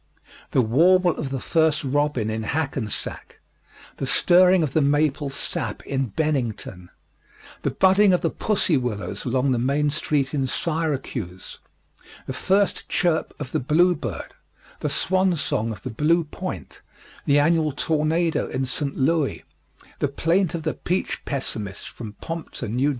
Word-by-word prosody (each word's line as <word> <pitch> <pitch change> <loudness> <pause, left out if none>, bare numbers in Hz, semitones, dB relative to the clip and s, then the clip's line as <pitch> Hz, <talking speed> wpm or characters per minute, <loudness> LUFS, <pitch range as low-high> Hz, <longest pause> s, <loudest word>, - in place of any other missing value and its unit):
The 130 - +3
warble 175 +9 +4
of 140 - -4
the 135 -1 -3
first 160 +2 +2
robin 140 -5 0
in 110 0 -2
Hackensack, 135 -3 -4 0.6
the 135 - -3
stirring 180 +4 +5
of 140 -4 -2
the 160 - +3
maple 145 0 +1
sap 135 - -4
in 135 -1 -1
Bennington, 115 - -2 0.7
the - - 0
budding 190 +1 +4
of 180 - +2
the 165 - 0
pussy 195 -7 +1
willows 120 -5 -3
along 130 +2 +1
the 125 - +1
main 145 +4 +1
street 145 -2 -1
in 135 -3 0
Syracuse, 135 - -3 0.7
the - - -4
first 195 +1 +1
chirp 170 -3 +1
of 140 -4 -6
the - - 0
blue 175 +7 +3
bird, - - -6 0.5
the - - -1
swan 185 -1 +2
song 115 -7 -1
of 110 - -8
the 130 - -4
blue 165 +8 +2
point, 150 - -7 0.5
the 145 - +5
annual 155 +1 +3
tornado 160 +3 0
in 130 +1 -2
St. 140 +2 -2
Louis, 150 +1 +1 0.6
the - - +2
plaint 170 +5 +1
of 165 - -4
the 155 - -1
peach 180 +2 -2
pessimist 110 -8 -4
from 110 -3 -8
Pompton, 160 -5 -6
N.J. 140 +3 +3
145 Hz, 150 wpm, -24 LUFS, 130-165 Hz, 0.7 s, stirring